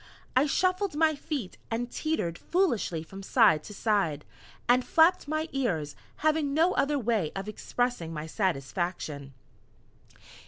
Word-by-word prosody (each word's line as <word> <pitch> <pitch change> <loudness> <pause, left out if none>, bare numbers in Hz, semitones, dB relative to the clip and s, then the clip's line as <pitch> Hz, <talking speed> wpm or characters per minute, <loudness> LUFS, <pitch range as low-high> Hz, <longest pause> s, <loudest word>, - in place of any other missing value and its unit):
I 265 +4 +4
shuffled 370 +3 +1
my 315 0 +4
feet, 280 - -5
and 240 +2 -2
teetered 245 - -2
foolishly 235 - 0
from 195 +4 -10
side 195 - +4
to 210 - -8
side, 195 -10 0 0.4
and 250 +1 +4
flapped 325 +2 +4
my 310 +1 -1
ears, 175 - -1 0.3
having 305 -2 +2
no 330 +4 +4
other 290 +1 +1
way 225 - 0
of 195 +1 -4
expressing 215 -4 -2
my 155 -1 -5
satisfaction. 160 - -3
230 Hz, 130 wpm, -28 LUFS, -, 0.4 s, I